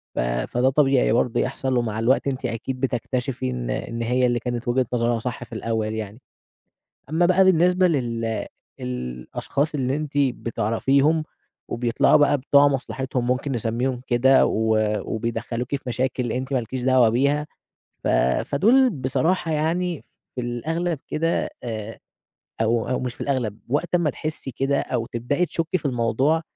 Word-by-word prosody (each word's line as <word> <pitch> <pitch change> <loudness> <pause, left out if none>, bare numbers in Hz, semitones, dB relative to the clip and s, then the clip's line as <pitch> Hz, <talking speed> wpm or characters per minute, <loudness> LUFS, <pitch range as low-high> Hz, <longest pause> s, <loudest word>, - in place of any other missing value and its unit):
ف - - -1
فده - - +1
طبيعي 135 -3 +3
برضه 120 0 +2
يحصل 130 -2 -1
ومع 110 -2 -1
الوقت 130 +4 +2
أنتِ 130 -1 -2
أكيد 125 +3 -3
بتكتشفي 125 - -2
إن - - -4
إن 115 - -3
هي 125 +2 +2
اللي 120 -1 +1
كانت 120 +1 -4
وجهة 125 +1 +2
نظرها 120 -1 +1
صح 125 +1 -4
في 115 - -12
الأول 110 -1 -2
يعني. 110 +2 -6 0.9
أمّا 165 +3 +2
بقى 185 +2 +5
بالنسبة 180 +1 +4
لل 115 -7 -1 0.3
الأشخاص 65 - -3
اللي 135 -1 0
أنتِ 150 -1 -4
بتعرفيهم 135 +4 +1 0.4
وبيطلعوا 120 +3 +3
بقى 145 -1 +4
بتوع 140 +2 +5
مصلحِتهم 130 -2 -2
ممكن 130 +2 0
نسميهم 120 +2 -1
كده، 130 +2 +5
و 110 0 +1 0.2
وبيدخلوكي 115 +4 -3
في - - -23
مشاكل 125 -1 -1
أنتِ 130 +2 -3
مالكيش 125 0 -2
دعوة 130 -3 +5
بيها، 140 +5 +1 0.6
ف - - 0 0.4
فدول 240 - +4
بصراحة 160 +4 0
يعني 165 +2 -1 0.3
في 125 - -3
الأغلب 160 +7 -2
كده 165 +2 0
آآ، 110 -2 -5 0.6
أو 115 +1 +1
أو 130 - 0
مش 125 -2 -3
في - - -22
الأغلب 120 -7 -1
وقت 155 +6 -1
امّا 170 -4 +3
تحسي 155 -3 -5
كده 135 +2 0
أو 115 - -2
تبدأي 125 +9 -1
تشكي 165 +3 -1
في - - -19
الموضوع 130 +6 +1
130 Hz, 150 wpm, -23 LUFS, 115-145 Hz, 0.9 s, بقى